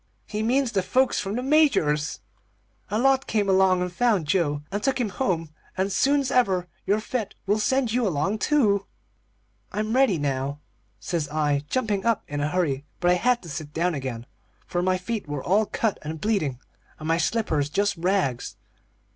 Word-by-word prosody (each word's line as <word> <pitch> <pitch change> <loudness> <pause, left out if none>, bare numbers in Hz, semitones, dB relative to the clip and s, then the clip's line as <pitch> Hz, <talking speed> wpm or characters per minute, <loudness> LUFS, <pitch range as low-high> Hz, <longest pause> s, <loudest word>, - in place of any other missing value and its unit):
He 210 0 -4
means 250 +3 +1
the 195 - +1
folks 260 +7 +2
from 195 +1 -3
the 250 - -2
Major's. 260 - +2 0.7
A 210 - 0
lot 270 +2 +3
came 210 -2 +1
along 190 -1 +4
and 180 -1 -4
found 215 -5 +2
Joe, 145 -3 0
and 205 +1 -2
took 270 +2 0
him 235 -4 0
home, 170 - -1 0.3
and 190 +2 0
soon's 275 +4 +2
ever 190 -8 +2 0.2
you're 205 +2 +3
fit 215 -2 -4
we'll 205 +2 +2
send 250 +2 +1
you 240 -1 +1
along, 190 +6 0
too.' 210 -8 +2 0.8
"'I'm 215 +1 -2
ready 260 -9 +4
now,' 140 -1 -2 0.4
says 165 -4 -2
I, 145 -1 0
jumping 215 -6 0
up 230 -2 +1
in 145 0 -3
a 150 - 0
hurry. 150 -6 0 0.2
But 175 - +3
I - - +6
had 240 +6 +2
to 170 - -9
sit 150 0 -6
down 175 +2 +1
again, 130 -5 -4 0.4
for 175 - -1
my 185 +1 +2
feet 210 0 -4
were 145 -2 -3
all 205 +4 +2
cut 225 -3 -1
and 155 +1 -6
bleeding, 185 - 0 0.4
and 155 - -7
my 165 0 +2
slippers 170 -7 0
just 200 +6 +1
rags. 170 -8 -1
190 Hz, 180 wpm, -25 LUFS, 155-225 Hz, 0.8 s, I